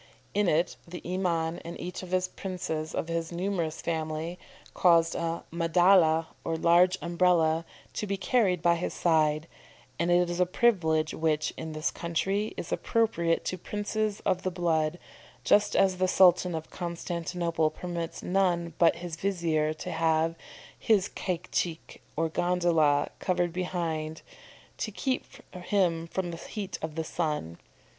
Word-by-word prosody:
In 205 -1 +2
it 170 +2 +1
the 175 +1 -8
Iman 170 -3 -1
and 170 - -8
each 180 0 -5
of 185 - -9
the 185 0 +1
princes 160 -4 -4
of - - -2
his 165 0 -2
numerous 170 -3 -2
family, 160 +1 -3 0.3
caused 165 -2 +4
a 170 0 -2
madalla, 170 -1 +4 0.2
or 165 - -1
large 175 +3 +4
Umbrella, 170 -2 +2 0.3
to 210 - -3
be 200 0 -1
carried 185 -4 +1
by 170 0 +4
his 170 - -3
side; 155 -2 +2 0.5
and 170 +1 +1
it 175 0 +4
is 175 +1 -3
a 180 - +3
privilege 160 -8 +2
which, 155 -1 0
in 160 -1 -6
this 155 0 -1
country, 195 +5 -1
is - - -6
appropriated 170 -8 +1
to 185 - -3
princes 210 +2 -2
of 185 -2 0
the 185 - -1
blood, 165 -2 0 0.5
just 205 0 +3
as 190 -1 +3
the 185 0 +2
Sultan 180 -1 +5
of 160 0 -6
Constantinople 170 -2 -2
permits 170 +1 -5
none 175 -3 +1
but 170 -1 +5
his 170 -1 -6
vizier 165 -5 0
to - - -6
have 160 0 +2 0.5
his 205 -3 +2
caique, 175 -2 -3
or 165 +1 +1
gondola, 165 -4 +2
covered 175 -2 0
behind, 165 -4 -3 0.6
to - - -2
keep 260 +5 -2 0.3
him 175 -3 0
from 175 0 -3
the 165 - -6
heat 195 +1 -6
of 160 -1 -5
the 160 - -1
sun. 150 - -3
170 Hz, 150 wpm, -28 LUFS, 160-185 Hz, 0.6 s, Sultan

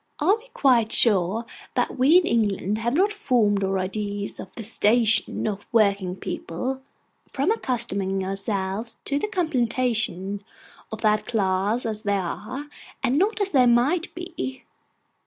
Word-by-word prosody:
Are 365 +8 +4
we 455 +2 -15
quite 245 - +2
sure 210 0 +3 0.3
that - - 0
we 280 +7 +5
in 365 - +3
England 210 - 0
have 235 +3 -1
not 395 +5 +3
formed 230 - +1
our 195 0 0
ideas 200 +2 -3
of - - -7
the 230 - -6
'station' 220 +1 +2
of 205 -1 -4
working 200 -5 +2
people, 255 +9 -4 0.5
from 280 +9 +1
accustoming 200 - -1
ourselves 195 +2 -3
to 280 0 0
the 425 - -1
contemplation 235 - -1 0.5
of 220 - -6
that 215 -1 +2
class 205 +1 0
as 215 -2 -2
they 205 -1 0
are, 210 +9 -5 0.4
and 265 +3 +2
not 425 +4 +1
as 395 -1 +1
they 255 -4 +5
might 280 +10 +2
be? 345 -7 -6
225 Hz, 145 wpm, -24 LUFS, 200-265 Hz, 0.5 s, we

